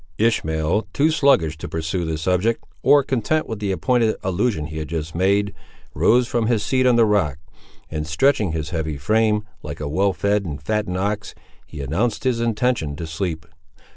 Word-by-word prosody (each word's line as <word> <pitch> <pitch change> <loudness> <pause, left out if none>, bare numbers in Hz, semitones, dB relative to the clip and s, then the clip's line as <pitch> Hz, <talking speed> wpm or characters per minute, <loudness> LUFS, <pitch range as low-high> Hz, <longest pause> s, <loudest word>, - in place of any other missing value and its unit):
Ishmael, 85 -4 +1
too 155 +3 +3
sluggish 130 - +3
to - - -6
pursue 80 +2 -2
the 80 -1 -2
subject, 90 +8 0 0.2
or 145 -1 +5
content 135 +5 0
with 110 -2 -5
the 100 -2 -1
pointed 120 0 +2
allusion 95 -2 0
he 80 0 -6
had 75 - -5
just 80 0 -4
made, 100 +3 +1 0.4
rose 125 +1 +3
from 120 -2 0
his 115 -3 +1
seat 130 +3 +2
on 125 - +5
the 115 -1 +5
rock, 95 -10 +1 0.5
and 75 0 -4
stretching 105 - +2
his 80 -1 -4
heavy 80 -3 -2
frame, 105 +7 +1 0.2
like 75 -1 -7
a 75 - -3
well 95 +7 +2
fed 100 +2 0
and 75 -6 -5
fattened 105 +3 -2
ox, 100 +1 -2 0.3
he 75 - -8
announced 100 - -1
his 125 -3 +1
intention 115 - 0
to 80 - -5
sleep. 80 -1 -4
100 Hz, 180 wpm, -22 LUFS, 80-115 Hz, 0.5 s, or